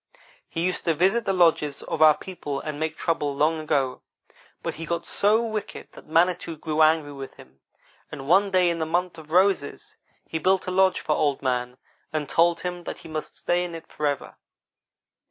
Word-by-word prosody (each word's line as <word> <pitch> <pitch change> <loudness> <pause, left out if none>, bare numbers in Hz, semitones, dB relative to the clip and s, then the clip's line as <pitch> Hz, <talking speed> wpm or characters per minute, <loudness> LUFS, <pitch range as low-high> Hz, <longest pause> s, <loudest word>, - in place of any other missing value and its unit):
He 165 - -3
used 185 - -1
to 165 - +2
visit 195 +8 +2
the - - +1
lodges 165 -5 +2
of 155 - -4
our 155 -1 +7
people 145 -7 -5
and 150 0 -5
make 160 0 -2
trouble 150 -4 -1
long 155 +3 +2
ago, 135 -4 -1 0.6
but - - -2
he 165 - -7
got 170 +1 -2
so 215 +3 +2
wicked 220 -2 -5
that - - -15
Manitou 170 0 +1
grew 155 0 -1
angry 150 -3 +2
at 135 - -10
him, 65 +1 -17 0.5
and 140 -2 -7
one 195 +5 +4
day 180 -2 +3
in 165 - -3
the 160 - -1
month 175 +1 -1
of 155 -1 -13
roses, 185 -5 +1 0.3
he 160 - -4
built 190 +2 +2
a 185 - -3
lodge 190 0 +3
for 150 - 0
Old 145 -3 0
man 125 -1 -1 0.3
and 155 -2 -2
told 170 +2 +3
him 175 -1 -5
that - - -5
he - - -12
must 155 -1 -5
stay 175 0 0
in 175 -1 -5
it 165 - -9
forever. 145 -2 -3
160 Hz, 195 wpm, -25 LUFS, 150-180 Hz, 0.6 s, our